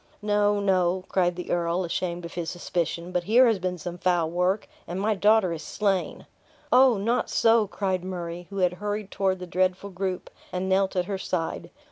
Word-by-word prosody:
"No, 205 0 +2
no," 185 -2 +1
cried 180 -2 +1
the 180 - -6
earl, 175 +1 0
ashamed 175 0 -3
of 170 - -8
his 170 -2 -3
suspicion; 175 0 -3
"but 180 -1 -1
here 240 +6 +6
has 225 -5 +2
been 180 0 -2
some 175 +2 -7
foul 175 -3 +1
work 180 +4 0 0.2
and 175 +2 -4
my 215 +2 +1
daughter 205 -2 +3
is 160 - -6
slain." 195 -3 -1 0.5
"Oh, 255 -2 +6
not 230 +5 0
so!" 225 -2 +4
cried 190 -2 -2
Murray, 175 -1 -5
who 200 - -7
had 180 -2 +2
hurried 210 -1 -3
toward 190 -1 0
the 180 - -7
dreadful 185 +2 0
group, 185 0 -4 0.2
and 185 +1 -2
knelt 190 0 +2
at 180 -1 +1
her 195 0 -3
side. 170 -3 -3
185 Hz, 190 wpm, -26 LUFS, 175-200 Hz, 0.5 s, here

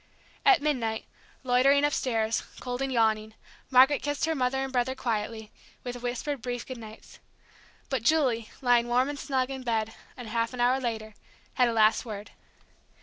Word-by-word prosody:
At 390 -8 +5
midnight, 235 -7 -1 0.4
loitering 265 +3 +4
upstairs, 230 -6 0 0.2
cold 250 0 -4
and 270 0 -1
yawning, 220 -2 +1 0.3
Margaret 265 +2 +6
kissed 290 0 -1
her 320 - 0
mother 260 -2 0
and 270 0 -5
brother 255 +1 0
quietly, 220 -3 -3 0.3
with 245 -1 -6
whispered 250 +3 -3
brief 245 -1 -4
good 255 -2 -7
nights. 220 -1 -12 0.7
But 265 -4 -1
Julie, 245 -5 +2
lying 240 -1 +4
warm 250 +3 +2
and 290 -1 -5
snug 265 -2 -1
in 265 -1 -5
bed 225 -3 -1 0.2
half 230 0 -2
an - - -9
hour 250 +2 +3
later, 220 -4 -4 0.4
had 250 - +3
a - - -1
last 220 -1 +4
word. 210 -3 -7
245 Hz, 160 wpm, -28 LUFS, 225-265 Hz, 0.7 s, Margaret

